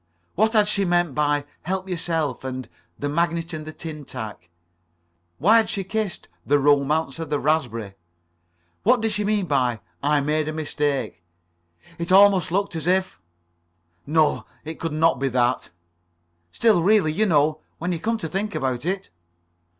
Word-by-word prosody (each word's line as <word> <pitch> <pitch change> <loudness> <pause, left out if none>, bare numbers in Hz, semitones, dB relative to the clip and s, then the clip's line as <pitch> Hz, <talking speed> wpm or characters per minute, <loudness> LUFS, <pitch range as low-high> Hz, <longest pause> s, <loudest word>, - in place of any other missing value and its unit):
What 220 +4 +2
had 210 -2 +4
she 200 -1 +1
meant 175 -4 +1
by 145 0 +1 0.2
"help 190 +2 -3
yourself," 165 -7 -2
and 130 -2 -5 0.3
"the 145 - -3
magnet 170 +2 -1
and 155 -1 -6
the - - -5
tin 155 -2 -7
tack?" 110 -10 -8 0.9
Why 205 - +5
had 225 - +2
she 195 - -2
kissed 210 -1 -3 0.2
"The 145 +8 +3
Romance 145 +1 +2
of 165 -2 -5
the 145 -1 0
Raspberry?" 120 -9 -1 0.9
What 245 +2 +3
did 225 -1 +1
she 210 0 0
mean 205 -1 +1
by 125 -7 +1 0.2
"I 145 +1 +2
made 150 +2 0
a 155 - -2
mistake?" 145 - -2 0.8
It 170 +1 -3
almost 195 -2 +6
looked 195 -1 0
as 160 +1 -4
if... 185 - +1 0.9
No, 155 0 +2 0.2
it 160 +1 -7
could 165 - -3
not 155 -3 +2
be 135 0 0
that. 120 -1 0 0.8
Still, 220 -7 +3
really 195 -3 +4
you 215 +7 +1
know, 155 -2 +2 0.2
when 175 +2 -2
you 170 - -2
came 230 +5 -1
to 165 - -5
think 205 +5 -3
about 130 0 -2
it 190 +1 -3
160 Hz, 165 wpm, -23 LUFS, 145-190 Hz, 0.9 s, almost